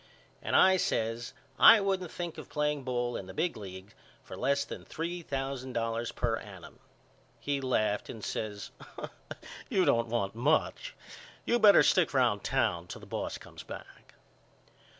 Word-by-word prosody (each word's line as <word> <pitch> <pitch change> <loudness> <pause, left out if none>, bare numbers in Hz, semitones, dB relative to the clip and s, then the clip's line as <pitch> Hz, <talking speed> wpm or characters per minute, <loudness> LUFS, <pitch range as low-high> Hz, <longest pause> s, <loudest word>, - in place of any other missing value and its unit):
and - - -1
I 190 0 +6
says 115 -7 -1 0.3
I 225 - +10
wouldn't 190 -3 -1
think 175 0 -6
of - - -10
playing 150 0 0
ball 120 -1 -2
in 95 - -7
the 95 - -10
big 165 +2 0
league 95 -1 -9 0.3
for - - -9
less 140 +2 +1
than - - -8
three 170 +2 -4
thousand 135 -3 -4
dollars 115 0 -2
per 115 -2 -1
annum. 95 -5 -11 0.6
He 140 -1 -2
laughed 110 -5 0
and 110 - -8
says 105 -2 -4 1.0
You 185 -2 +2
don't 115 -5 +3
want 110 -4 -1
much. 155 - 0 0.5
You 240 - +2
better 210 -2 +8
stick 170 -6 +3
round 120 -6 +2
town 85 0 0
till - - -8
the - - -11
boss - - -4
comes - - -12
back. - - -11
130 Hz, 155 wpm, -30 LUFS, 110-160 Hz, 1.0 s, I